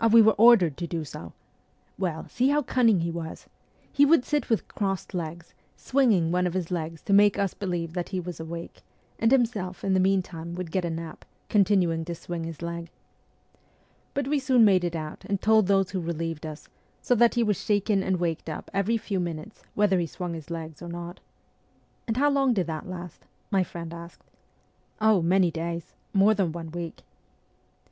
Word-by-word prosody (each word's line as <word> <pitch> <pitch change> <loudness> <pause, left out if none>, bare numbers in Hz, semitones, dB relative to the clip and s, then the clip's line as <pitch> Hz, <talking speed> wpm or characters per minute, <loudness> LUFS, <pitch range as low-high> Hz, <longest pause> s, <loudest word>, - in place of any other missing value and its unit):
we 230 - +8
were 220 0 +7
ordered 200 - +6
to 175 - -4
do 165 -2 -3
so!... 85 - -9 0.7
Well, 175 -4 -2
see 250 +2 +1
how 295 +1 +2
cunning 230 -7 +3
he 170 0 -1
was: 165 -1 -6 0.5
he 285 - +5
would 285 -3 +5
sit 295 -2 -1
with 225 - +1
crossed 195 -2 -3
legs, 170 -1 -5 0.2
swinging 220 -12 +2
one 180 0 +2
of 175 - -4
his 185 -1 -2
legs 165 -2 -4
to 200 - 0
make 205 0 +6
us 200 -2 0
believe 175 -4 -3
that 175 -1 -3
he 190 - -2
was 175 -2 -6
awake, 165 +1 -7 0.4
and 225 +1 +3
himself, 220 -8 +1
in 195 - +1
the 190 - +3
meantime, 180 -3 0
would 180 -2 -5
get 185 +1 0
a - - -1
nap, 165 0 -6 0.3
continuing 185 -5 +3
to 170 0 -4
swing 165 0 -5
his 165 0 -7
leg. 170 0 -5 1.3
But 280 -1 -1
we 295 0 +1
soon 260 -4 +4
made 190 -3 +4
it 170 -1 -2
out 155 -1 -6
and 200 -1 -1
told 220 -2 +4
those 195 -2 +2
who 185 -1 -2
relieved 165 -1 -4
us, 155 0 -9 0.4
so - - +3
that 235 0 +4
he 240 - +3
was 210 -4 0
shaken 205 -1 +2
and 190 -1 0
waked 165 -2 -2
up 155 - -7
every 200 +4 +1
few 205 -3 -3
minutes, 175 +4 -5
whether 200 -3 +3
he 170 - -1
swung 175 +1 -5
his 160 -2 -8
legs 160 -3 -6
or 175 - -7
not.' 175 +1 -7 0.9
'And 225 0 -1
how 290 +2 +4
long 270 -3 +2
did 185 -4 +1
that 160 +2 -5
last? 180 -2 -8
' - - -41
my 195 -2 +3
friend 170 -2 -7
asked. 170 0 -11 0.4
' - - -39 0.3
Oh, 215 -3 +4
many 180 +1 +3
days 170 0 -5 0.2
more 200 +2 +5
than 195 -6 0
one 165 -1 -7
week.' 170 0 -6
180 Hz, 200 wpm, -26 LUFS, 170-210 Hz, 1.3 s, we